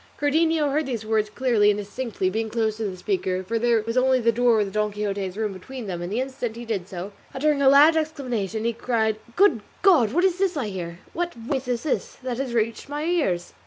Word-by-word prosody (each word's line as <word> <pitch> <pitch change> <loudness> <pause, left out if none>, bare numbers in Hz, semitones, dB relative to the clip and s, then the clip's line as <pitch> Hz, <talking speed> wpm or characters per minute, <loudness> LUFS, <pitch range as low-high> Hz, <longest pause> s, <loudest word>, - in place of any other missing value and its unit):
Cardenio 310 0 +2
heard 300 0 0
these 230 -4 -3
words 215 -1 +1
clearly 220 -3 +2
and 205 - +2
distinctly, 210 -1 -3
being 225 +2 -1
quite - - -14
close 220 -1 +1
to 225 - -3
the 190 -2 -4
speaker, 190 - -1
for 230 +4 -2
there 235 -2 +2
was 230 +2 -3
only 260 0 +4
the 230 -1 +3
door 235 -1 +3
of 200 -2 -1
Don 210 0 0
Quixote's 200 -2 -3
room 215 -2 -1
between 245 +6 -8
them, 180 -3 -4
and 175 +2 -5
the 220 - 0
instant 260 -3 -3
he 235 +1 -7
did 200 -6 -3
so, 190 +1 -6 0.2
uttering 290 +1 +1
a 270 - +6
loud 295 +4 +7
exclamation 250 - -2
he 235 - +1
cried, 220 -2 0 0.2
"Good 360 - +4 0.2
God! 310 - +5
what 345 +7 +2
is 370 -1 +2
this 380 -4 +1
I 240 -7 -2
hear? 170 -3 -6 0.2
What 350 0 -2
voice 250 +3 -3
is 245 -1 -1
this 305 - -2
that 250 -1 -3
has 260 -3 -3
reached 230 +3 -1
my 295 +1 -3
ears?" 280 - 0
230 Hz, 235 wpm, -24 LUFS, 210-280 Hz, 0.2 s, loud